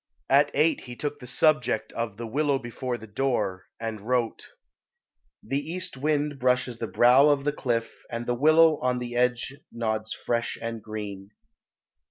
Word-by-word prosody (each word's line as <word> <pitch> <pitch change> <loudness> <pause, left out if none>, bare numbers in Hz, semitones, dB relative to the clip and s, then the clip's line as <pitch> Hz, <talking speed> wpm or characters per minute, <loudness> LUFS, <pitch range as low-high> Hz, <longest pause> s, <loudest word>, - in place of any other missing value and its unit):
At 145 +2 +6
eight 155 +3 +2
he 120 -1 -8
took 145 +2 -4
the 125 - -10
subject 145 -3 +1
of 115 -3 -3
the 115 - -5
"Willow 140 +4 +1
before 120 0 -4
the 110 - -11
Door," 105 -5 -1
and 110 -2 -4
wrote 120 +1 -1 1.0
"The 135 +5 -1
east 180 +4 -4
wind 145 0 0
brushes 125 -2 +1
the 115 - -2
brow 125 +6 +6
of 145 -1 +2
the 145 0 0
cliff 115 -5 -2
And 120 0 -4
the 120 - 0
willow 155 +4 +5
on 125 0 +1
the 120 -1 -5
edge 125 +1 +1 0.2
nods 110 -1 -2
fresh 120 0 -2
and 115 -1 -5
green." 100 -2 -6
125 Hz, 165 wpm, -26 LUFS, 115-145 Hz, 1.0 s, At